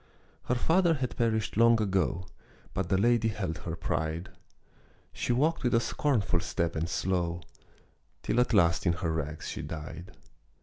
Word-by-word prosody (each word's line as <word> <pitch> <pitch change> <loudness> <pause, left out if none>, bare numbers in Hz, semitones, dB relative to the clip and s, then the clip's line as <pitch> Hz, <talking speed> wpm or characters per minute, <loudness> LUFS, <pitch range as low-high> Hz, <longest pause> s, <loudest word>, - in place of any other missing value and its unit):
Her 125 - +1
father 165 +6 +3
had 130 -3 -3
perished 110 -3 0
long 115 0 +6
ago, 95 -3 0 0.5
But 95 -2 -2
the 95 - +3
lady 115 +2 +3
held 95 -6 -3
her 85 -2 -5
pride. 80 +2 -2 0.8
She - - -2
walked 150 +7 +2
with 125 -3 +2
a - - +5
scornful 115 - +1
step 85 0 -2
and 80 +1 -1
slow, 90 -2 -1 0.8
Till 120 - +1
at 125 - +2
last 85 +1 +3
in 85 - +4
her 85 -1 -2
rags 75 -1 -4
she - - -4
died. 80 +3 -8
95 Hz, 160 wpm, -29 LUFS, 85-120 Hz, 0.8 s, long